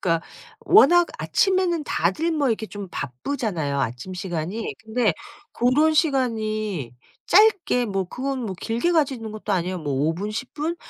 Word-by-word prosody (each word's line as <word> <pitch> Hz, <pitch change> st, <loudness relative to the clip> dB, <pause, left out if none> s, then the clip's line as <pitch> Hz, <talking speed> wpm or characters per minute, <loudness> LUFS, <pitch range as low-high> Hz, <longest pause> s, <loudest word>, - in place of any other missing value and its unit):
그러니까 165 Hz, -2 st, 0 dB, 0.3 s
워낙 350 Hz, -5 st, +6 dB
아침에는 370 Hz, -5 st, +1 dB
다들 195 Hz, -, 0 dB
뭐 295 Hz, -4 st, +1 dB
이렇게 220 Hz, -1 st, -1 dB
좀 205 Hz, -2 st, -7 dB
바쁘잖아요 145 Hz, -, -3 dB
아침 125 Hz, +10 st, -4 dB
시간이. 180 Hz, +4 st, -4 dB
근데 220 Hz, -3 st, +1 dB, 0.4 s
고런 290 Hz, +6 st, +3 dB
시간이 215 Hz, -, 0 dB, 0.3 s
짧게 400 Hz, -, +4 dB
뭐 195 Hz, -2 st, -1 dB
그건 260 Hz, +7 st, -4 dB
뭐 190 Hz, -, -4 dB
길게 240 Hz, +10 st, 0 dB
가지는 265 Hz, -9 st, 0 dB
것도 215 Hz, -1 st, -4 dB
아니야. 180 Hz, 0 st, -1 dB
뭐 145 Hz, -4 st, -3 dB
5 150 Hz, +5 st, +1 dB
분, 205 Hz, +4 st, -4 dB
10 235 Hz, +4 st, -6 dB
분? 320 Hz, +3 st, -2 dB
220 Hz, 290 characters per minute, -23 LUFS, 180-290 Hz, 0.4 s, 워낙